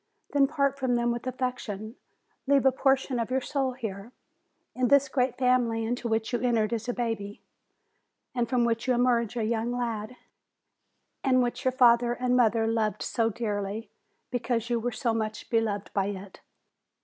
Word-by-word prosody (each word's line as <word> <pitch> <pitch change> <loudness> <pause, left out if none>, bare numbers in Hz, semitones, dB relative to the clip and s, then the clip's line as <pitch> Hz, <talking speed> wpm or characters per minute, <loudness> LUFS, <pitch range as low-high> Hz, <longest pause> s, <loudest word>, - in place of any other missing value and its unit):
Then 280 -1 +5
part 280 -2 0
from 255 -2 +1
them 240 0 +1
with 240 +1 -4
affection; 245 -4 -4 0.5
leave 275 -1 +4
a 265 - +6
portion 265 -1 +1
of 230 - -2
your 260 +1 +1
soul 265 -1 -1
here, 220 -3 -6 0.6
in 255 0 +1
this 280 +1 +5
great 255 -2 0
family 245 -3 +2
into 240 +1 -2
which 220 +1 -1
you 240 - +1
entered 235 -3 +1
as 230 +1 -3
a - - 0
baby, 225 -4 -3 0.9
and 240 -2 -1
from 245 -2 +2
which 230 +1 -1
you 255 - +3
emerge 240 -2 +1
a 230 - 0
young 225 +1 -1
lad, 235 -2 -3 1.1
and 255 -2 +4
which 240 - -3
your 260 - +4
father 240 -2 +4
and 250 0 0
mother 225 -2 +3
loved 225 -2 0
so 225 -2 0
dearly, 210 -1 -3 0.4
because 240 -1 -1
you 235 - +2
were 245 +2 -2
so 230 0 -1
much 215 -1 -4
beloved 220 -3 0
by 195 -1 +1
it. 195 -1 -7
240 Hz, 175 wpm, -28 LUFS, 225-255 Hz, 1.1 s, a